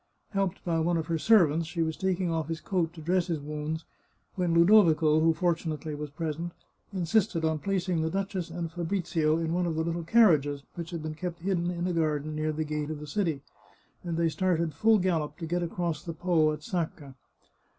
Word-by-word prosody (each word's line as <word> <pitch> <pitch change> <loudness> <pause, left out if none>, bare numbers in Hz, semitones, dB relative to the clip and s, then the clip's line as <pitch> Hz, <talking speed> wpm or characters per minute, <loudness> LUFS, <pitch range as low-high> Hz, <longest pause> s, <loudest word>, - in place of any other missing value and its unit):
Helped 195 -2 -1
by 165 -2 +1
one 170 +1 +1
of 160 - -2
her 165 0 -1
servants, 165 -6 +4
she 170 -1 -1
was 160 0 -2
taking 185 -2 0
off 160 -2 -1
his 165 0 -3
coat, 170 -1 -1
to 165 - -10
dress 180 +2 +1
his 165 -4 -1
wounds, 150 +2 -4 0.5
when 180 -3 0
Ludovico, 170 -3 +5
who 165 +1 +4
fortunately 160 -2 -1
was 150 0 -5
present, 165 +3 -4 0.4
insisted 185 -2 +1
on 160 -1 0
placing 185 -2 0
the 160 - 0
duchess 190 -1 -3
and 165 -1 -4
Fabrizio 165 -3 0
in 165 0 -1
one 175 0 +1
of 165 - -1
the 160 - 0
little 170 +1 -2
car 215 0 +6
riages, 145 -1 -4
which 170 -1 -6
had 170 -3 -5
been 155 0 -4
kept 170 +1 -5
hidden 180 -2 0
in 175 0 -2
a 180 - 0
garden 155 -2 0
near 155 0 -1
the 155 +1 -2
gate 150 -1 -3
of 155 -1 -4
the 150 - -7
city, 160 -2 -1 0.6
and 170 -2 -3
they 170 0 +2
started 170 -2 0
full 220 +8 +4
gallop 160 -6 -1
to 165 - -5
get 175 +2 -1
across 170 -2 -2
the 170 -1 -6
Po 160 -2 +2
at 150 0 -6
Sacca. 160 - -4
165 Hz, 210 wpm, -28 LUFS, 155-180 Hz, 0.6 s, car